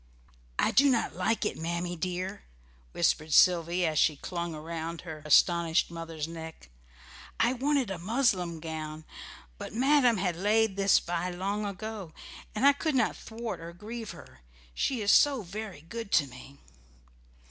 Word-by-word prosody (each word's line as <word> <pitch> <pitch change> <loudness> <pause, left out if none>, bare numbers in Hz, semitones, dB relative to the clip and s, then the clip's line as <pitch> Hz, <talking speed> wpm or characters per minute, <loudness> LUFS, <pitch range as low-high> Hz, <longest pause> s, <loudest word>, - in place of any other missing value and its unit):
"I - - +2
did 280 +1 +5
not 230 -3 0
like 225 -1 0
it, - - -2
Mammy 170 +2 -3
dear," 185 +3 -4 0.5
whispered 155 - +1
Sylvy, 175 0 +4
as 155 -2 +1
she 155 - +3
clung 170 +2 -5
round 165 +1 -5
her 160 -3 -8
astonished 170 +2 +3
mother's 165 -2 -5
neck. 160 - -9 0.7
"I 235 +2 +3
wanted 265 -3 0
a 185 - -4
muslin 185 -5 0
gown; 155 -1 -6 0.5
but - - -7
madam 255 -2 +4
had 180 -2 -1
laid 210 +3 +2
this 195 0 +4
by 175 +1 -3
long 200 +4 -2
ago, 200 -3 -6 0.4
and 215 - +1
I 285 - +8
could 305 +1 -2
not 255 - +2
thwart 230 0 -6
or 165 +1 -9
grieve 220 +4 -7
her, 65 - -12 0.3
she 250 - -1
is 205 - +4
so 280 -6 +5
very 195 -3 -7
good 205 +6 -7
to 145 - +5
me." 135 +1 -13
180 Hz, 155 wpm, -29 LUFS, 165-220 Hz, 0.7 s, I